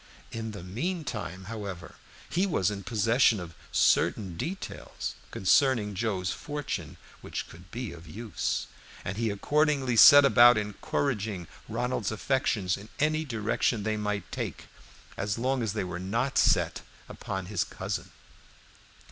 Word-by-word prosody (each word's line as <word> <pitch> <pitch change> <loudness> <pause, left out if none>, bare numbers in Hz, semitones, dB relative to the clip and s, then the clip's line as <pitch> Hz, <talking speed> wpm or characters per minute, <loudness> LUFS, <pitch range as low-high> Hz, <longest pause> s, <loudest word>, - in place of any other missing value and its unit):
In 115 0 -4
the 100 -4 -8
mean 160 - -3
time, 95 - -5
however, 100 -4 -6 0.3
he 185 +3 +1
was 100 - +1
in 100 -1 -5
possession 115 +1 +3
of 85 -2 -8 0.2
certain 95 -5 +2
details 185 - -5 0.2
concerning 110 +1 +3
Joe's 95 -3 -1
fortune 145 -1 -5 0.2
which - - -5
could 90 +2 -14
be 120 0 -5
of 85 0 -12
use, 110 +7 -3 0.4
and 95 - -3
he 115 +1 0
accordingly 140 +4 +1
set 145 +5 +10
about 120 -3 +7
encouraging 105 - -2 0.2
Ronald's 120 -1 -1
affections 110 -5 0
in 105 +3 -12
any 155 +1 +1
direction 115 -2 0
they 110 +1 0
might 105 -2 -3
take, - - -4 0.6
so 105 +2 -2
long 130 +1 0
as 110 -3 -1
they 110 - -1
were 90 -1 -5
not 115 +9 -1
set - - +3 0.3
upon 95 -1 -5
his 95 -2 0
cousin. - - -5
110 Hz, 140 wpm, -28 LUFS, 95-125 Hz, 0.6 s, set